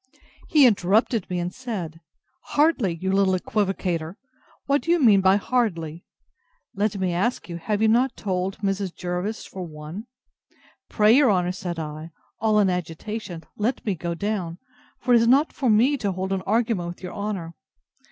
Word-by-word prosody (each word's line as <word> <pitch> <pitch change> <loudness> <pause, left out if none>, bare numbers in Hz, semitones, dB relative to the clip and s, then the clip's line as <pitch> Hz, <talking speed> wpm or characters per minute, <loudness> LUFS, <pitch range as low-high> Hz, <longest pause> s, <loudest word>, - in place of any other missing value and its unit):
He 300 -4 +6
interrupted 215 0 +2
me, 180 - -2
and 175 +1 -3
said, 185 -11 -6 0.5
Hardly! 290 - +3
you 190 +3 -2
little 195 -1 +3
equivocator! 185 -4 -2 0.5
what 280 +1 +2
do - - -8
you 345 0 +4
mean 215 -8 +6
by 190 +1 +5
hardly? 180 -8 -1 0.7
Let 205 +1 -1
me 185 -2 -1
ask 200 +8 -1
you, 170 -1 -5
have 205 +5 -2
not 235 +3 +3
you - - -14
told 190 -1 -1
Mrs. 195 -2 -2
Jervis 180 +5 -3
for 190 - -8
one? 160 +6 -8 0.8
Pray 215 0 +4
your 275 -2 +5
honour, 180 -2 +1
said 180 -2 -5
I, 155 0 -6 0.3
all 215 0 +2
in 200 - +4
agitation, 180 +1 -4
let 225 +5 -1
me 205 - +1
go 170 0 -4
down; 185 -3 -3 0.4
for 250 - +1
it - - +8
is 230 - +2
not 275 +6 +4
for 260 -4 0
me 245 +7 +4
to 200 -6 -2
hold 190 +1 -3
an 190 - -1
argument 220 -5 +1
with 175 +2 -8
your 180 - -6
honour. 200 -5 -4
195 Hz, 170 wpm, -24 LUFS, 175-220 Hz, 0.8 s, it